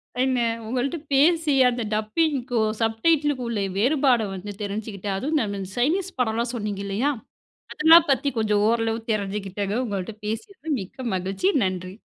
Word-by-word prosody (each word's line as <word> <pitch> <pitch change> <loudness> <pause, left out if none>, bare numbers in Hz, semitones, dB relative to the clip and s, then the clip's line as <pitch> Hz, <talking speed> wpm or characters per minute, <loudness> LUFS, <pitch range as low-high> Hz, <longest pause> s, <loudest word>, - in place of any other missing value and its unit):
சரிங்க. 255 0 +1 0.3
உங்கள்ட்ட 255 +7 -1 0.2
பேசி, 315 +2 +4 0.2
அந்த 245 0 -3
டப்பிங்க்கும், 240 -1 0
சப் 225 0 +1
டைட்டில் 300 -3 +4
க்கும் 250 -3 -5
உள்ள 215 -3 -1 0.2
வேறுபாட 255 +1 +3
வந்து 195 +2 -6
தெரிஞ்சுகிட்டேன், 205 -1 -4
அதுவும் 295 +8 0
நானு 200 -3 -3
இந் 185 - -6
சைனீஸ் 355 +9 0
படம்லாம் 235 0 0
சொன்னீங்க 210 -3 -3
இல்லயா? 225 +9 0 0.6
அதெல்லாம் 325 +2 +6
பத்தி 275 +2 +1
கொஞ்சம் 210 -2 +2
ஓரளவு 225 0 0
தெரிஞ்சுகிட்டேங்க. 200 -1 -2
உங்கள்ட்ட 200 0 -4
பேசியது 295 - -4
மிக்க 240 +7 -7
மகிழ்ச்சி. 190 - 0 0.2
நன்றி. 185 0 -4
230 Hz, 145 wpm, -24 LUFS, 205-280 Hz, 0.6 s, அதெல்லாம்